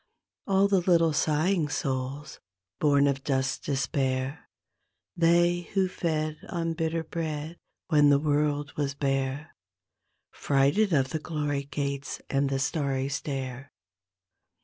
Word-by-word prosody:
All 195 0 +4
the 195 -2 +3
little 170 -3 +3
sighing 155 +3 +1
souls 135 +1 -3 0.4
bom 145 -1 +4
of 135 -1 0
dust's 130 -1 0
despair, 135 0 -2 0.7
They 175 +1 +3
who 190 -1 +3
fed 155 -4 -2
on 165 -2 -2
bitter 165 0 -1
bread 160 0 -4 0.3
when 150 -3 +5
the 140 - +6
world 145 0 0
was 140 -1 -2
bare, 135 +1 -2 0.8
Frighted 145 +9 +2
of 135 -4 +2
the 160 - -1
glory 145 -3 -2
gates 140 0 -4
and 140 0 +1
the 135 - 0
starry 135 -1 -1
stair. 135 -1 -4
145 Hz, 120 wpm, -27 LUFS, 140-165 Hz, 0.8 s, the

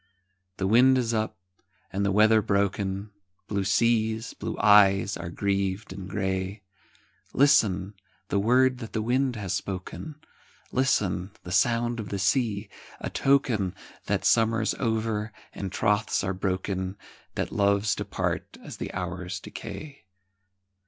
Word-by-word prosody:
The 95 - -1
wind 125 +6 +5
is 120 -2 0
up, 110 -1 -1 0.6
and 100 +1 0
the 100 - +2
weather 110 +2 +5
broken, 100 0 -1 0.4
Blue 100 -2 -1
seas, 110 +3 +1
blue 110 +1 -5
eyes, 100 -1 +5
are 85 - -6
grieved 100 +1 -1
and 95 -1 -8
grey, 95 +1 -2 0.7
Listen, 105 -9 +3 0.4
the 100 - +1
word 125 +4 +3
that 115 -3 -8
the 110 - 0
wind 125 +2 +1
has 100 -4 -3
spoken, 95 - -5 0.6
Listen, 100 -8 +1
the 90 - -8
sound 120 +4 +2
of 105 - -5
the 100 - -2
sea,—a 100 0 -2
token 125 -9 +2 0.3
That - - 0
summer's 115 -1 +3
over, 110 -2 -1 0.2
and 95 -2 -5
troths 105 0 +1
are 95 0 -1
broken,— 95 0 -2 0.4
That - - -2
loves 100 +1 +2
depart - - -3
as - - -8
the - - -5
hours 90 0 -4
decay. 145 -2 -9
105 Hz, 130 wpm, -27 LUFS, 95-115 Hz, 0.7 s, wind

